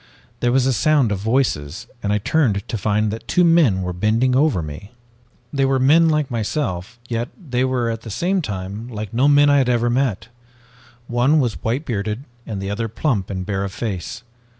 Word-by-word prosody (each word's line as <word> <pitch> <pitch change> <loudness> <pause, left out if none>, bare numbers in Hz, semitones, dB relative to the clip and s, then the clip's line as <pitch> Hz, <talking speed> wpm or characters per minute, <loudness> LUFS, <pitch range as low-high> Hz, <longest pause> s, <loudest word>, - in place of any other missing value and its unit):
"There 120 - +1
was 130 0 +3
a 135 - +2
sound 145 -3 +2
of 100 - -1
voices, 110 - -1 0.2
and 100 - -1
I 105 - +2
turned 105 -2 +1
to - - -3
find 105 +1 +1
that 110 - -7
two 180 - +3
men 160 - +4
were 90 0 -3
bending 110 +7 +1
over 135 - +2
me. 75 +9 -9 0.6
They 140 -1 +1
were 135 0 +2
men 155 +6 +5
like 150 -4 0
myself, 110 - -3
yet 120 0 -2
they 130 -8 -1
were 125 -3 0
at 115 0 -5
the 115 - -9
same 180 - 0
time 100 - -5
like 110 -3 -6
no 130 +5 +3
men 145 0 +5
I 145 - +5
had 130 -2 +1
ever 120 -1 +2
met! 120 -4 -1 0.8
One 125 +6 +2
was 120 -6 -1
white 125 +7 -1
bearded 105 +2 -3 0.2
and 105 -3 -4
the 95 +1 -4
other 115 +2 -2
plump 110 - -1
and 95 -2 -4
bare 95 -1 -2
of 95 -1 -5
face. 105 0 -5
115 Hz, 200 wpm, -21 LUFS, 100-135 Hz, 0.8 s, men